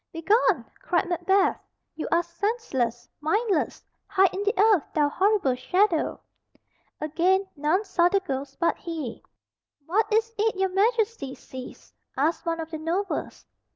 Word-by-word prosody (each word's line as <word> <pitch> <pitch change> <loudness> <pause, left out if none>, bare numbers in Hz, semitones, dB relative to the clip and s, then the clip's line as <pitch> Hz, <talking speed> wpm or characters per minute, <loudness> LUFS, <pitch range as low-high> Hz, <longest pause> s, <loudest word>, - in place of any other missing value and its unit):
"Begone!" 340 - +2 0.2
cried 350 +1 0
Macbeth. 370 +3 +2 0.3
"You 315 - -5
are 340 - +3
senseless, 340 - -2
mindless! 380 +3 0 0.2
Hide 385 -2 +3
in 385 - -3
the 415 +3 0
earth, 415 -6 +5
thou 295 -2 +3
horrible 385 -5 +2
shadow." 335 +7 +1 0.8
Again 355 +6 +2
none 310 +7 +1
saw 350 -3 +3
the 395 - +3
ghost 280 -7 -5
but 340 - +2
he. 315 -8 -5 0.6
"What 425 +7 +1
is 450 +1 +2
it 440 0 +2
your 380 0 +1
Majesty 415 - 0
sees?" 260 -1 -11 0.2
asked 315 +5 0
one 330 0 0
of 325 0 -5
the 315 - -4
nobles. 355 +5 -3
355 Hz, 140 wpm, -26 LUFS, 310-405 Hz, 0.8 s, earth